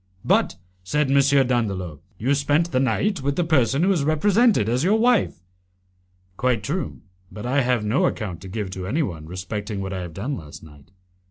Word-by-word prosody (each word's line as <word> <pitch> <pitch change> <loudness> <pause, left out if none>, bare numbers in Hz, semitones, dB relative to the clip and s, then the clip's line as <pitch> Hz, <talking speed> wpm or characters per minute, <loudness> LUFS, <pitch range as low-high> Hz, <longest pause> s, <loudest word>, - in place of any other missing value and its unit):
"But," - - +2 0.3
said 145 +8 0
M. 140 0 +5 0.3
Dandolo, 95 - -1 0.2
"you 130 +6 +1
spent 145 +4 +1
the 130 - +2
night 140 - 0
with 140 +1 -1
the 175 - +1
person 140 -3 +2
who 195 - +3
is 170 -7 +1
represented 195 - +3
as 125 +4 +1
your 200 +5 +3
wife?" 230 - +2 0.9
"Quite 125 -5 +1
true, 170 - -4 0.3
but 105 - -8
I 135 +3 +2
have 125 -4 +1
no 110 +6 +2
account 95 -7 -4
to 95 - -9
give 100 0 -4
to 95 -1 -5
anyone 95 - -2
respecting 100 +4 -5
what 95 0 -4
I 95 - -3
have 85 -3 -8
done 130 +9 -3
last 75 - -10
night. 75 -1 -16
125 Hz, 185 wpm, -23 LUFS, 95-150 Hz, 0.9 s, M